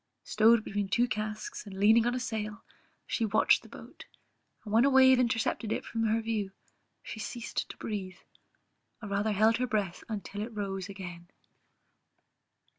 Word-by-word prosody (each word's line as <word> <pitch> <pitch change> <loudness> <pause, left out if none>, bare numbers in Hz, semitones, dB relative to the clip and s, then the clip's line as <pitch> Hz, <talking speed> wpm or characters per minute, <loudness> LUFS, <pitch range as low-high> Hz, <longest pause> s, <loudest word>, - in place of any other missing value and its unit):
Stowed 220 +1 +4
between 205 -2 -3
two 240 +5 +2
casks, 215 -1 -5
and 190 -1 -8
leaning 220 +3 +5
on 245 - 0
a - - -1
sail, 220 -2 -4 0.4
she 230 - -2
watched 215 -1 +3
the - - -16
boat, - - -12 0.6
and 210 - -7
when 230 +2 +6
a 280 - +5
wave 260 -1 +6
intercepted 225 -2 0
it - - -2
from 225 -1 -2
her 220 +1 +2
view 215 -4 -2 0.5
she 220 - -7
ceased 235 +2 -4
to - - -9
breathe, 190 -4 -5 0.9
or 205 - -6
rather 205 +2 0
held 220 +3 +4
her 250 +1 -1
breath 205 -6 -2
until 205 -1 -5
it 225 +1 -6
rose 195 -2 -4
again. 175 -3 -8
215 Hz, 165 wpm, -30 LUFS, 200-230 Hz, 0.9 s, when